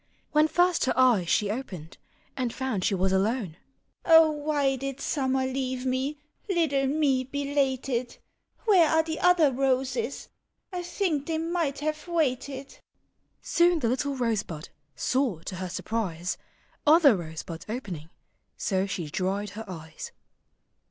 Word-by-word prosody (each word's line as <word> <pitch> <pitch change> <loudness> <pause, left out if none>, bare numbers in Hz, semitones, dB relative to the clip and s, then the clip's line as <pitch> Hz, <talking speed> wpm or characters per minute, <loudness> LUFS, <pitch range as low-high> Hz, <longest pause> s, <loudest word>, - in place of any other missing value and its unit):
When 305 0 +4
first 350 0 +2
her 260 - 0
eyes 235 -9 +4
she 205 -1 +2
opened, 190 - -7 0.4
And 250 -3 -1
found 255 -8 -2
she 195 - +2
was 190 +1 +1
alone. 195 -2 0 0.3
" - - -49 0.2
Oh, 325 -1 +7
why 290 -2 0
did 275 +1 -5
Summer 265 -2 0
leave 260 -1 -2
me, 260 +3 -1 0.3
Little 300 -7 +2
me. 275 -2 +2
belated? 265 -3 -1 0.5
Where 365 -8 +5
are 320 0 +4
the 320 0 -4
other 355 -5 +5
roses? 265 - -1 0.4
I 360 - -2
think 345 -5 -1
they 325 -1 0
might 325 -4 -1
have 305 +2 -3
waited." 275 -4 -2 0.6
Soon 345 0 +3
the 235 -7 0
little 275 +3 -1
rosebud 210 - -2 0.3
Saw 235 - 0
to 185 - -6
her 185 0 -4
surprise 185 -3 -2 0.5
Other 300 -5 +7
rosebuds 160 -1 -7
owning. 185 - -5 0.5
So 190 -1 0
she 175 -4 -4
dried 190 +5 -2
her 220 +1 -7
eyes. 160 -4 -8
265 Hz, 140 wpm, -27 LUFS, 205-300 Hz, 0.6 s, Oh